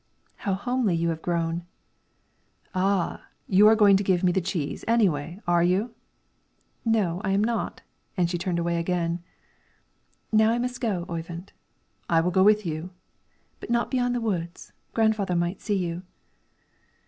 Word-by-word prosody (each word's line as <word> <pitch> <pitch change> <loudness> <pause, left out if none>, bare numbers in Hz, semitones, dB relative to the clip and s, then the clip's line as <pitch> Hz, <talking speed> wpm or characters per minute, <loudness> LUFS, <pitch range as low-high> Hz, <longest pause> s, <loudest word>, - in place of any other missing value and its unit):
"How 195 -3 -1
homely 245 -2 0
you 170 0 0
have 160 -1 -3
grown!" 170 -1 -1 1.1
"Ah! 185 -1 0 0.2
you 200 +2 +6
are 220 - +7
going 205 -3 +6
to 200 - -1
give 185 -2 +1
me 180 - +4
the 190 - +1
cheese, 165 -4 -3
anyway; 180 -7 +1
are 175 -1 +3
you?" 190 +7 +1 0.9
"No, 200 -6 +1
I 195 - -1
am 200 +1 +2
not," 230 +1 -2 0.3
and 175 -2 +3
she 175 0 -3
turned 175 -1 -1
away 170 0 0
again. 170 0 -1 1.1
"Now 220 0 +5
I 230 - +2
must 250 +1 -3
go, 195 -8 -1
Oyvind." 170 +2 -6 0.6
"I 165 - +4
will 175 +2 +1
go 190 - +3
with 210 +1 +5
you." 160 +2 -4 0.7
"But - - -9
not 235 0 +1
beyond 245 -2 +1
the 240 - -1
woods; 175 -6 -4 0.2
grandfather 215 -5 +2
might 175 +2 -1
see 205 -3 0
you." 175 -1 -3
185 Hz, 160 wpm, -26 LUFS, 170-215 Hz, 1.1 s, are